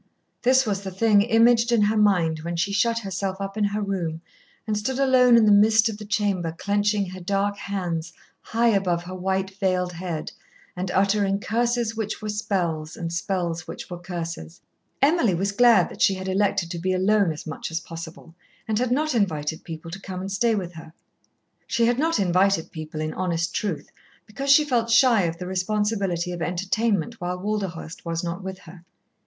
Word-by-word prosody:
This 260 +2 +4
was 200 -3 -1
the 195 - -5
thing 205 +2 +3
imaged 230 +1 +4
in 230 -3 +4
her 210 +2 +2
mind 180 -7 +3
when 170 +2 -4
she 180 +4 -1
shut 230 +3 +2
herself 195 -2 -3
up 195 0 -5
in 215 -1 +1
her 205 +1 -1
room 175 -5 -2 0.5
and 215 -2 -1
stood 225 +5 -2
alone 255 -3 +5
in 225 - +5
the 210 - +5
midst 215 +2 +5
of 210 -1 -6
the 210 - -8
chamber 200 -5 0
clenching 205 +1 +1
her 185 0 -8
dark 200 +2 0
hands 180 -5 -4 0.3
high 230 +1 +1
above 185 -5 +1
her 180 +1 -8
white 190 +1 -1
veiled 180 -2 0
head, 170 -3 -5 0.4
and 180 +1 -3
uttering 195 +1 +2
curses 235 +1 0
which 220 -1 -3
were 215 - -5
spells, 180 -7 -2
and 170 0 -4
spells 170 -2 -2
which - - -8
were 175 - -5
curses. 170 -1 -6 0.4
Emily 280 - +3
was 195 +3 -1
glad 235 +1 +5
that - - -10
she 195 - +4
had 190 0 -6
elected 190 -2 0
to 170 - -4
be 185 +2 0
alone 195 0 +3
as 155 - -8
much 160 - -5
as 165 0 -2
possible, 165 0 -10 0.3
and 215 -1 0
had 250 0 0
not 305 +3 +1
invited 160 -8 -1
people 165 0 -8
to 195 +3 -7
come 185 -1 -6
and 190 +1 -5
stay 225 +3 +2
with 180 -4 -4
her. 160 -1 -11 0.8
She 230 - +2
had 240 +2 +1
not 325 +2 +2
invited 185 -1 +2
people, 155 -1 -6
in 155 0 -3
honest 170 -3 -1
truth, 195 -8 -3 0.3
because 275 +6 -5
she 295 +2 +7
felt 240 -5 0
shy 230 -4 +5
of 165 0 -3
the 180 - -6
responsibility 190 -1 -1
of 175 -1 -5
entertainment 195 +4 -1
while 180 +1 -2
Walderhurst 190 -5 -4
was 165 0 -3
not 170 +2 -4
with 190 0 -5
her. 170 +1 -14
195 Hz, 195 wpm, -24 LUFS, 175-215 Hz, 0.8 s, she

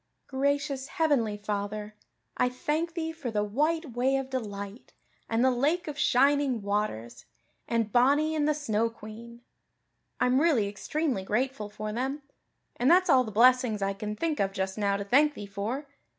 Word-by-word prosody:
"Gracious 280 0 -1
heavenly 280 - +1
Father, 210 +1 -4 0.4
I 250 - +2
thank 305 +6 -2
Thee 325 -1 -2
for 320 -6 -6
the 210 -2 0
White 300 +8 0
Way 250 +3 +1
of 270 0 -3
Delight 205 -3 -6 0.4
and 230 +2 +2
the 260 - +5
Lake 300 +8 0
of 300 - -4
Shining 275 -4 +2
Waters 200 - -3 0.4
and 230 -2 0
Bonny 285 +7 +3
and 300 -1 +1
the 305 - +2
Snow 230 -6 0
Queen. 230 +1 -11 0.8
I'm 255 +2 +3
really 285 -11 +3
extremely 250 +4 -2
grateful 220 +1 -1
for 215 0 -5
them. 265 +5 -3 0.5
And 250 - +2
that's 365 +2 +5
all 255 - +6
the 220 - -6
blessings 235 -1 +4
I 195 0 0
can 210 +2 -5
think 315 +5 -2
of 195 -1 0
just 190 0 -2
now 200 -2 0
to 200 - -3
thank 290 +8 +3
Thee 205 - -7
for. 210 +8 -4
245 Hz, 165 wpm, -28 LUFS, 210-285 Hz, 0.8 s, all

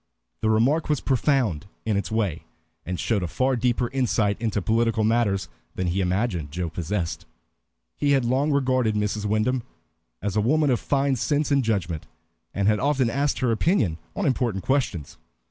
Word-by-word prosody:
The 110 - +1
remark 130 +10 +2
was 150 -3 +2
profound 125 - +1 0.2
in 110 -2 +1
its 100 -3 -1
way, 105 -8 -1 0.4
and 90 0 -3
showed 110 -4 0
a 90 - -2
far 130 +10 +1
deeper 120 0 +1
insight 115 -6 +1
into 110 -3 0
political 115 +2 +1
matters 110 -3 +1 0.3
than 95 - -2
he 90 +2 0
imagined 90 -4 -1
Joe 85 +2 -3
possessed. 85 +1 -3 0.7
He 145 -1 +2
had 135 -3 +2
long 135 +5 +1
regarded 130 -5 +1
Mrs. 105 0 -1
Wyndham 110 +5 +1 0.6
as 100 -1 -3
a 105 - +3
woman 145 +5 +2
of 120 - +2
fine 140 -1 +1
sense 145 +4 0
and 140 -1 +3
judgment, 90 -8 -2 0.4
and 100 0 0
had 105 0 +3
often 135 -5 +1
asked 140 +3 0
her 125 -2 +2
opinion 110 - +1 0.2
on 200 - -1
important 120 - 0
questions. 120 - -1
115 Hz, 170 wpm, -24 LUFS, 100-130 Hz, 0.7 s, a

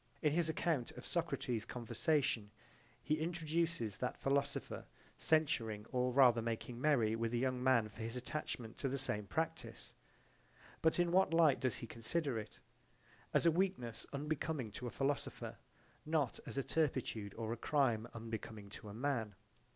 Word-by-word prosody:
In 150 -1 +4
his 165 -1 +2
account 160 -5 0
of - - -9
Socrates's 115 -4 -1
conversation 125 - 0 0.5
he 155 +1 +1
introduces 165 - 0
that 125 - -2
philosopher 140 +1 0 0.3
censuring 115 -9 +2
or 125 0 +2
rather 125 -3 +6
making 115 +1 -3
merry 125 -7 +4
with 115 +1 -1
a - - +2
young 130 0 0
man 130 -4 +4
for 110 +1 -11
his 115 +2 -3
attachment 125 -3 -4
to 135 - 0
the 135 - -1
same 105 -6 -1
practise. 160 +6 -3 0.9
But 160 0 +4
in 175 -1 +3
what 185 -2 +4
light 160 -5 +6
does 130 -1 +1
he - - -6
consider 120 +3 -1
it? 105 0 -9 0.7
As - - +3
a 170 - +7
weakness 165 - -1
unbecoming 145 -4 -2
to 125 +4 -5
a - - -2
philosopher, 140 +3 -2 0.4
not 150 -5 +1
as - - -5
a 135 - +1
turpitude 125 -10 0
or 115 0 -2
a - - -2
crime 120 -3 +2
unbecoming 110 -2 -6
to 105 - -9
a 100 - -8
man. 120 -5 -1
130 Hz, 160 wpm, -37 LUFS, 115-155 Hz, 0.9 s, a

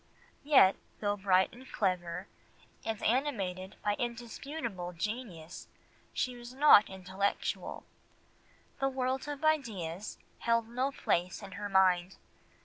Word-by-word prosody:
Yet 270 -10 +6 0.2
though 205 -1 +1
bright 190 -2 +3
and 255 +2 -13
clever, 180 -1 -1 0.6
and 225 -2 -3
animated 200 -8 0
by 205 - +2
indisputable 235 - -4
genius, 180 -4 -5 0.4
she 250 -1 -1
was 240 +1 -10
not 270 -7 +8
intellectual; 190 +1 -2 0.9
the 270 - +2
world 260 +1 -1
of 290 0 -5
ideas 210 - -1 0.2
held 230 -1 +2
no 255 +4 0
place 180 -9 -1
in 195 - -8
her 205 +2 -5
mind. 185 -1 +3
210 Hz, 115 wpm, -32 LUFS, 185-255 Hz, 0.9 s, not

